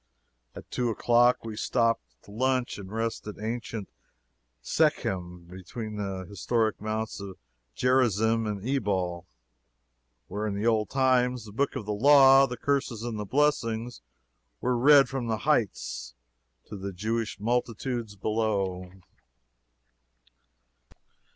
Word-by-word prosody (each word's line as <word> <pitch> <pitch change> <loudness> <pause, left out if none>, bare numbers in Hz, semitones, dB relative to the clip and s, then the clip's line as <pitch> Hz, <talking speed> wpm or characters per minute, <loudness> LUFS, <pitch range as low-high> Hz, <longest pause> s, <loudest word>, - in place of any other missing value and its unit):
At - - -11
two 125 -1 0
o'clock 120 +2 +3
we 110 -1 -5
stopped 115 0 +1 0.2
to - - -15
lunch 130 +1 0
and 95 -1 -9
rest 115 0 -3
at 105 - -7
ancient 115 -1 -4 0.8
Shechem, 90 -2 0
between 100 +5 -7
the 95 -2 -4
historic 110 +1 -1
Mounts 110 +1 -3
of 100 -2 -8 0.4
Gerizim 115 - +2
and 105 +1 -4
Ebal, 95 -9 -1 1.0
where 105 +1 -3
in 100 - -2
the 105 +2 -2
old 110 -2 +2
times 125 -3 +2
the 105 - -10
books 140 +8 -1
of 120 -6 -4
the 105 - -2
law, 135 +3 +7
the 125 - -6
curses 125 -4 -1
and 115 -3 -4
the 105 - -3
blessings, 120 -2 0 0.6
were 125 0 0
read 140 +3 +6
from 130 -3 -4
the 110 -1 0
heights - - -1 0.5
to 105 - -8
the 100 +1 -5
Jewish 110 +3 -2
multitudes 120 0 -2
below. 100 -4 -1
110 Hz, 125 wpm, -27 LUFS, 100-125 Hz, 1.0 s, law